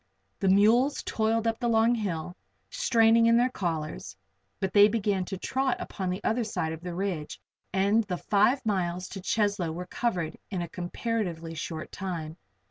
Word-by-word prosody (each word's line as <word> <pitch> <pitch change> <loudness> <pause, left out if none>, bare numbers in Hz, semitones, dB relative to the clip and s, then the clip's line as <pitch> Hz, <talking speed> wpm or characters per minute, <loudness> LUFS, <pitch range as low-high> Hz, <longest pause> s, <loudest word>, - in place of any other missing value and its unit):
The 195 - 0
mules 225 +8 +4
toiled 225 +1 0
up 225 0 0
the 240 -2 0
long 225 +1 +4
hill, 180 -6 -3 0.4
straining 230 -1 +4
in 230 0 +5
their 245 +1 +3
collars; 160 -8 -4 0.4
but 190 - -2
they 205 0 +8
began 205 -4 0
to 190 - -5
trot 265 +6 0
upon 190 -3 -4
the 185 +3 -3
other 235 +2 +1
side 160 -7 -2
of 160 - -8
the 175 -1 -5
ridge 180 -5 -3 0.3
and 200 +4 +3
the 180 -3 -3
five 215 +9 +2
miles 185 -3 -1
to 195 - -7
Cheslow 200 -4 0
were 175 +3 -5
covered 180 -6 -2
in 185 -4 -2
a 170 - -6
comparatively 175 -3 -3
short 160 0 -5
time. 170 -5 -5
195 Hz, 170 wpm, -28 LUFS, 175-225 Hz, 0.4 s, they